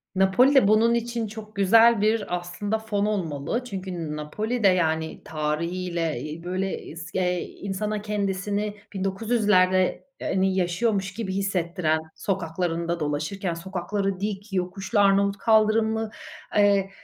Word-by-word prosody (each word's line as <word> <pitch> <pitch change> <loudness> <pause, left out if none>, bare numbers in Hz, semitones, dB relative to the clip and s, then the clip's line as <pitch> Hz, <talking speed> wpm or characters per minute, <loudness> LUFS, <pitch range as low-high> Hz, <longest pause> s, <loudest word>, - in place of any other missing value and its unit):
Napoli'de 200 +6 +5
bunun 225 +2 +4
için 235 -1 -1
çok 215 0 -10
güzel 225 +3 +5
bir 215 -4 +1
aslında 200 +5 -3
fon 210 -2 -1
olmalı. 190 - -2
Çünkü 190 -5 -6
N 160 -3 -4
Napoli'de 210 +9 -1
yani 160 -3 +1
tarihiyle, 165 +2 -2
iii, 155 +2 -7
böyle 185 +2 -2
isk 165 +1 -9
eee, 180 -1 +1
insana 205 +2 -4
kendisini 205 0 -2 0.2
1900'lerde 190 -2 +2 0.2
eee, - - -3
hani 190 0 +2
yaşıyormuş 190 +2 0
gibi 200 -3 -4
hissettiren, 175 -4 0 0.2
sokaklarında 170 -2 -2
dolaşırken 155 +5 -2
sokakları 190 +2 -3
dik, 200 0 -4
yokuşlu 190 +3 -1
Arnavut 200 0 +4
kaldırımlı, 220 0 +2 0.5
eee, 200 -1 +4
195 Hz, 120 wpm, -25 LUFS, 175-210 Hz, 0.5 s, Napoli'de